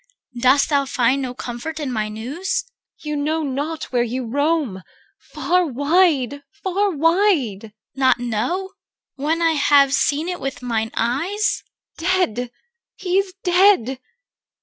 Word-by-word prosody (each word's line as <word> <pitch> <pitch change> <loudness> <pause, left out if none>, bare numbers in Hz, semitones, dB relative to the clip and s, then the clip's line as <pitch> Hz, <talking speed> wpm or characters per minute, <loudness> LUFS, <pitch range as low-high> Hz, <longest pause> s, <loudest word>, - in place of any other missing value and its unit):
Dost 260 +3 +4
thou 285 -2 +2
find 255 +3 +1
no 250 -2 -4
comfort 255 +7 -6
in 285 -4 -3
my 215 -3 -2
news? 300 - -3
EL. - - -32 0.4
You 300 - -1
know 310 +2 -1
not 290 +3 -3
where 245 - +3
you 245 +2 -2
roam. 285 - 0 0.4
Far 360 +1 0
wide! 285 -1 +2 0.2
far 395 +2 +1
wide! 325 - +2
CHR. 215 - -13 0.3
Not 260 -2 +4
know? 245 - -2 0.4
when 315 +4 -1
I 330 - +4
have 285 -2 +4
seen 295 +3 +1
it 360 -1 -3
with 270 -2 -5
mine 225 -2 -1
eyes? 330 - 0 0.4
EL. 365 - +2
Dear, 245 +2 -4 0.5
he 370 0 0
is 390 -1 -2
dead. 355 - +4
285 Hz, 145 wpm, -21 LUFS, 245-350 Hz, 0.5 s, Dost